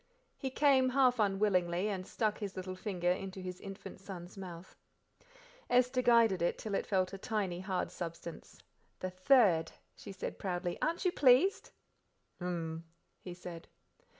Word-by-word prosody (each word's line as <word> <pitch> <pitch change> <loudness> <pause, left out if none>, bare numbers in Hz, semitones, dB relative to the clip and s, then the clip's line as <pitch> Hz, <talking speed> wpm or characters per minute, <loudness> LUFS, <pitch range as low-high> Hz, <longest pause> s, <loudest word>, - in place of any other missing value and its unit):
He 265 - -4
came, 265 -1 +4
half 255 -2 +3
unwillingly, 195 -3 +2
and 190 -3 -3
stuck 215 -2 -1
his 200 -3 -5
little 185 0 -4
finger 185 -2 -1
into 190 +1 -4
his 180 -1 -6
infant 195 -1 -9
son's 185 -2 -9
mouth. 180 -2 -9 0.9
Esther 250 +1 +3
guided 230 -6 +4
it 170 - +1
till 215 - -5
it - - -1
felt 185 -1 +1
a 195 - -6
tiny, 195 -5 -2
hard 190 0 -2
substance. 170 -1 -8 0.4
"The 185 - -3
third," 185 -5 +4 0.2
she - - -9
said 190 - -6
proudly; 180 -2 -2
"aren't 335 +4 0
you 360 - +4
pleased?" 285 +7 +4 0.7
"Hum!" 165 -2 -3 0.4
he 180 -1 -8
said. 175 -2 -9
190 Hz, 150 wpm, -33 LUFS, 180-230 Hz, 0.9 s, came